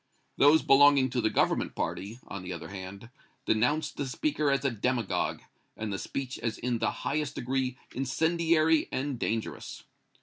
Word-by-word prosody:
Those 145 +3 +6
belonging 140 -2 +6
to 125 - 0
the 110 - +2
Government - - +1
party, 105 +4 -3
on 100 - -6
the 90 0 -7
other 80 -2 -7
hand, 100 +4 -8 0.3
denounced 125 +8 +1
the 140 - -2
speaker 155 - 0
as 140 0 +1
a 140 - +2
demagogue 120 -1 -1 0.3
and 110 -2 -3
the 95 - -3
speech 135 -1 -4
as 115 -2 -2
in 120 -2 -1
the - - +1 0.2
highest 150 +1 -1
degree 130 0 -1 0.2
incendiary 160 +4 +2
and 135 -2 -2
dangerous. 115 0 -3
130 Hz, 160 wpm, -29 LUFS, 110-145 Hz, 0.3 s, Those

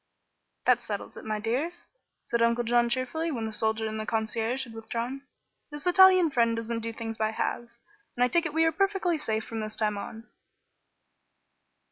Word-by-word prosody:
"That - - +4
settles - - -5
it, - - -9
my 215 -1 -2
dears," 290 +11 -2 0.4
said 235 0 -1
Uncle 235 +1 +3
John, 240 0 +3
cheerfully, 255 +7 -1
when 235 -7 -2
the 220 - -4
soldier 220 +1 0
and 220 0 -3
the 215 - -3
concierge 225 +3 -1
had 235 -3 -10
withdrawn. 235 +5 -5 0.4
"This 295 -1 -7
Italian 370 -2 +6
friend 230 -3 +2
doesn't 230 0 -3
do 230 0 -4
things 225 0 -6
by 215 0 +2
halves, 235 +1 -3 0.4
and 245 - +3
I - - +5
take 340 +4 +1
it 300 - -8
we 325 0 +4
are 325 - +3
perfectly 375 -2 +1
safe 220 -6 -1
from 225 - -5
this 215 0 -4
time 210 -2 0
on." 225 +3 -8
235 Hz, 185 wpm, -28 LUFS, 220-295 Hz, 0.4 s, Italian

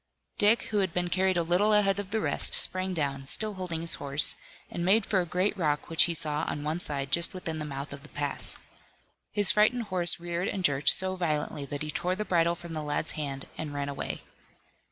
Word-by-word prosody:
Dick 210 +3 +3
who 210 - +2
had 190 -4 -1
been 175 0 -1
carried 185 0 +1
a 170 - +2
little 180 +6 +2
ahead 200 -2 +3
of 200 -2 -5
the 220 +2 -1
rest, - - +3
sprang 185 -1 +2
down, 140 -3 -3
still 215 +8 +4
holding 180 -4 -5
his 165 - +4
horse, 140 +2 +2 0.3
and 170 - -5
made 200 +4 +3
for 195 -4 +1
a 175 - -5
great 185 +5 0
rock 155 -4 -2
which 165 - +4
he 170 - -2
saw 150 -1 0
on 145 - -4
one 155 +3 -2
side 140 -4 -4
just 170 +4 +3
within 165 -3 -5
the 150 - -4
mouth 140 0 -6
of 140 - -10
the 150 - -15
pass. 145 -1 0 0.8
His 205 -3 +4
frightened 225 +3 +2
horse 175 -2 +2
reared 175 +2 -3
and 190 - -3
jerked 140 -3 +2
so 185 0 +5
violently 155 -4 -2
that 145 +1 -4
he 150 - -4
tore 180 +4 -2
the 210 +2 -4
bridle 170 -2 +1
from 170 -1 -10
the 155 - -2
lad's 150 +1 -2
hand 140 -3 -5
and 150 -2 -5
ran 140 0 -3
away. 140 - -5
170 Hz, 225 wpm, -28 LUFS, 150-185 Hz, 0.8 s, so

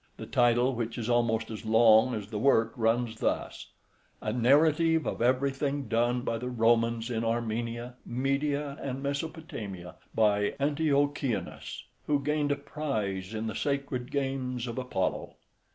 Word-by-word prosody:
The - - -7
title, 120 +1 +3
which 115 -1 -3
is 120 0 -2
almost 115 -1 +1
as 110 - -6
long 110 +2 +5
as 105 -1 -6
the 105 - -2
work, 115 -3 +3
runs 115 0 0
thus: - - -2 0.5
"A 105 - -3
narrative 155 +6 +4
of - - -3
everything 135 +2 +1
done 120 +2 +1
by 115 -2 -2
the 125 +2 -4
Romans 115 0 +2
in 115 -1 -1
Armenia, 115 +1 -2
Media, 140 +3 -1
and 135 0 -4
Mesopotamia, 140 - -5 0.2
by 105 -2 +2
Antiochianus, 145 -3 -1 0.2
who 145 -1 +2
gained 150 0 0
a - - +3
prize 110 -10 -3
in 110 +1 -3
the 110 - -3
sacred 140 -3 -2
games 135 -3 -2
of 120 +1 -4
Apollo." 125 -8 -2
120 Hz, 140 wpm, -29 LUFS, 115-140 Hz, 0.5 s, long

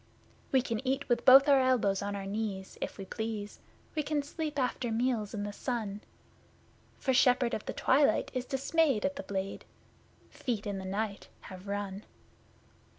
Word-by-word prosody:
We 265 -2 +4
can 230 -4 -2
eat 270 +2 -1
with 240 - +1
both 270 +2 +9
our 275 -2 +6
elbows 235 -7 +2
on 200 0 -3
our 195 -1 -5
knees, 195 -2 -4
if - - -4
we 195 - -6
please, 220 0 -5 0.3
We 310 - 0
can 295 0 -1
sleep 305 0 -4
after 250 -2 -1
meals 230 -2 0
in 205 - -3
the 205 0 -4
sun; 215 -4 -3 1.0
For 265 - 0
Shepherd 250 -1 +4
of 215 - -4
the - - -2
Twilight 280 +2 +3
is 255 -1 -2
dismayed 275 -2 +1
at 280 0 -1
the 285 - -4
Blade, 195 0 -4 0.7
Feet 230 -5 -3
in 200 -2 -3
the 190 - -7
Night 200 +1 -3
have 185 +1 -10
run! 200 -1 -3
230 Hz, 170 wpm, -31 LUFS, 205-265 Hz, 1.0 s, both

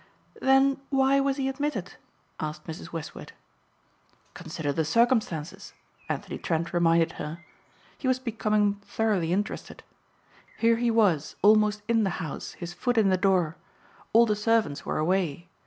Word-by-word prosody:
"Then 270 +1 +4
why 270 0 +3
was 275 0 0
he 270 -1 -1
admitted?" 270 -8 -3 0.5
asked 155 0 -5
Mrs. 165 0 -8
Westward. 165 -2 -7 1.0
"Consider 160 -4 -4
the 160 - 0
circumstances," 210 -5 0 0.4
Anthony - - -4
Trent 165 +1 -2
reminded 165 -1 +3
her. 160 +3 -7 0.5
He 265 - -3
was 255 -1 +3
becoming 215 -4 0
thoroughly 200 -7 0
interested. 205 +3 -3 0.7
"Here 230 0 +3
he 240 0 +1
was 195 -10 +2
almost 210 0 +4
in 230 -1 +3
the 195 - +1
house, 160 -6 -6
his 175 -1 -7
foot 245 +7 -1
in 210 -3 +4
the 190 - +4
door. 185 -4 +1 0.5
All 235 +1 +6
the 210 -2 +1
servants 210 -9 0
were - - -1
away. 170 0 -1
205 Hz, 140 wpm, -27 LUFS, 165-230 Hz, 1.0 s, All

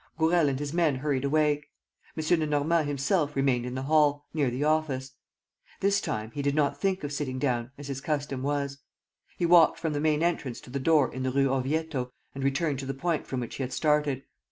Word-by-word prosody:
Gourel 160 -1 +3
and 135 - -1
his 145 0 -4
men 165 -5 +2
hurried 135 0 -1
away. 150 0 +2 0.5
M. 160 +2 +2
Lenormand 155 +1 +1
himself 145 +2 0
remained 130 -3 +1
in 125 - -5
the 130 - -3
hall, 145 0 +3
near 145 -5 +1
the 125 +4 -2
office. 150 -4 0 0.7
This 200 +1 +2
time, 110 +1 -3
he 145 - -4
did 140 0 0
not 145 -2 +1
think 190 -2 0
of 145 0 -4
sitting 135 -3 -3
down, 125 -3 -1
as 145 0 -8
his 135 -1 -4
custom 145 -3 -2
was. 140 0 -2 0.6
He 175 - +1
walked 170 -2 +6
from 160 -2 -2
the 145 - -1
main 155 0 +2
entrance 150 -8 -1
to - - -13
the 140 - -2
door 145 -2 +3
in 130 - -5
the 130 - 0
Rue 135 +1 +2
Orvieto 135 0 -1 0.2
and 135 - -5
returned 140 +1 0
to 135 - -5
the 135 - -3
point 165 +3 -1
from 130 -2 -3
which 120 - -6
he - - -4
had 130 0 -3
started. 150 -3 +1
145 Hz, 215 wpm, -28 LUFS, 135-155 Hz, 0.7 s, walked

